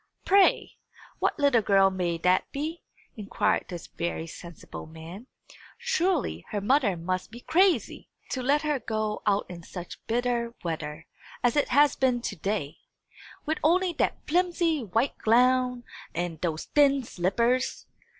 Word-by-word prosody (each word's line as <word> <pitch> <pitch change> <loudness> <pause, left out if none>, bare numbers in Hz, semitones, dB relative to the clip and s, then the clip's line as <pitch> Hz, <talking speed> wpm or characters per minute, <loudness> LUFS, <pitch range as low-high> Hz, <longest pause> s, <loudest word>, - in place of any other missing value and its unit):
"Pray, 395 0 +3 0.4
what - - 0
little 280 -6 +4
girl 195 -1 +4
may 175 -3 -1
that 180 +2 +1
be?" 310 +4 -4 0.3
inquired 210 -3 0
this 175 -3 -7
very 170 -1 -4
sensible 170 -1 -10
man. 165 +8 -10 0.5
"Surely 375 - 0
her 205 - -2
mother 215 -3 +2
must 185 +2 -3
be 235 +3 -11
crazy, 345 - +1 0.2
to 260 - -2
let 285 +4 +2
her 300 -3 0
go 215 -2 -2
out 205 0 +2
in 175 -1 -9
such 175 +1 -9
bitter 235 0 -1
weather 160 -2 -4 0.4
as 245 -1 +3
it 290 - +2
has 285 +2 +4
been 255 -2 +2
to 230 -3 -4
day, 190 -4 -3 0.7
with 315 +1 -1
only 355 +3 +3
that - - 0
flimsy 340 -3 +1
white 225 +6 0
gown 250 +2 +3 0.3
and 170 -2 -3
those 165 -2 -2
thin 280 -2 +3
slippers!" 235 +6 0
235 Hz, 140 wpm, -27 LUFS, 180-285 Hz, 0.7 s, little